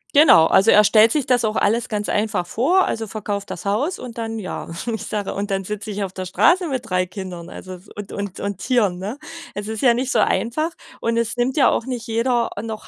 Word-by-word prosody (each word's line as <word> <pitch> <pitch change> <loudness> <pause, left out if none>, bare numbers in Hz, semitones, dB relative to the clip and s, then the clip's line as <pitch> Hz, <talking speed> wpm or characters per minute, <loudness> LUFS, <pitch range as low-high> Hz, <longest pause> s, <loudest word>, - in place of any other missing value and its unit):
Genau, 285 - +7
also, 195 +6 +5
er 210 0 +7
stellt 215 +2 +6
sich 290 -2 0
das 245 -2 +2
auch 215 0 0
alles 225 +3 +1
ganz 210 -1 -2
einfach 205 -4 -1
vor, 340 - +2
also: 225 -1 -3
„Verkauf 205 -1 -4
das - - -8
Haus.“, 240 - 0
und 240 -2 -9
dann, 225 -1 -4
ja 185 - -6 0.2
ich 220 - -4
sage: 205 -2 -3
„Und 200 0 -4
dann 195 0 -1
sitze 210 +2 -5
ich 205 0 -3
auf 190 -1 -5
der 185 -1 -5
Straße 345 - +3
mit 255 -4 -4
3 180 0 +1
Kindern, 180 -2 -8
also, 185 -1 -10
w - - -18
und 205 -1 -7
und 200 -2 -5
und 200 -2 -3
Tieren.”, 210 -7 +1
ne? 205 +8 -5 0.4
Es 205 0 -5
ist 220 -1 -4
ja 245 -3 +5
nicht 255 +2 -1
so - - +2
einfach, 310 +8 +1 0.3
und 230 0 0
es 235 -1 0
nimmt 245 +3 0
ja 280 - +6
auch - - -1
nicht 250 -3 -5
jeder, 235 +1 0
äh, 205 - -4
noch 220 -1 -6
215 Hz, 240 wpm, -21 LUFS, 200-240 Hz, 0.4 s, Genau